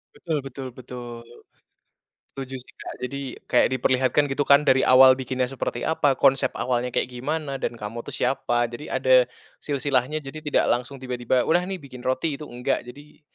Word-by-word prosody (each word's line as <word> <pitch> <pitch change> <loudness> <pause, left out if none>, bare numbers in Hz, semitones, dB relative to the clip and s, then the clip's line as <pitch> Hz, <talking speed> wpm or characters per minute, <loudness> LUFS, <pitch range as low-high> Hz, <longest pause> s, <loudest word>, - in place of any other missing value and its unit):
Betul 160 -3 -2
betul 135 0 -7
betul. 120 -2 -9 1.1
Setuju 135 -1 -6
sih, 125 - -13
Kak, - - -6
jadi 140 +2 -4 0.3
kayak 125 - +4
diperlihatkan 130 +3 +2
gitu 140 0 -2
kan 145 +1 +5
dari 130 0 +4
awal 130 0 +8
bikinnya 130 0 -2
seperti 125 -2 -4
apa, 145 -4 +2
konsep 135 0 +4
awalnya 125 -1 0
kayak - - 0
gimana, 140 +1 -3
dan 120 - -3
kamu 110 +2 -6
tuh - - -10
siapa. 120 -2 +1
Jadi 120 +5 -8
ada 130 -1 +4 0.3
silsilahnya, 140 0 0
jadi 150 +1 -7
tidak 150 -2 +1
langsung 125 +3 -2
tiba-tiba 125 -1 -1
udah 175 +2 +3
nih 190 - -3
bikin 130 -5 -12
roti, 130 +4 -1
itu 150 - -7
enggak, 125 +1 -1
jadi 145 +4 -14
130 Hz, 170 wpm, -24 LUFS, 125-140 Hz, 1.1 s, awal